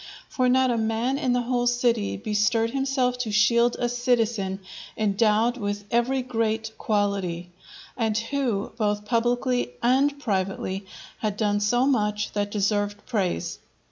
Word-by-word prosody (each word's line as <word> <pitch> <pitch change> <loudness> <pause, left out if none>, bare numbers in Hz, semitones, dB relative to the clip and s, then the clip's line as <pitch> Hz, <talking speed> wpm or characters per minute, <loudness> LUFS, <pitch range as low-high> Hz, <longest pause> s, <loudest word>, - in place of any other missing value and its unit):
For 255 -1 +1
not 260 0 +3
a 235 - 0
man 225 +5 0
in 255 - 0
the 245 0 +1
whole 245 0 0
city 240 -3 +1
bestirred 215 +2 +1
himself 265 -2 0
to 230 -4 -2
shield 235 +3 +4
a 245 - 0
citizen 230 -5 0 0.4
endowed 220 +3 +2
with 205 -2 -3
every 250 +3 +1
great 225 -2 -1
quality, 195 -5 -1 0.4
and 220 -3 0
who, 230 -3 -1
both 210 -2 0
publicly 245 - 0
and 275 +4 +3
privately, 195 -4 -2 0.3
had 210 -2 -2
done 205 -2 +1
so 240 +5 +2
much 210 -6 0
that 205 -1 -1
deserved 205 0 -1
praise. 190 - -2
225 Hz, 140 wpm, -25 LUFS, 205-245 Hz, 0.4 s, shield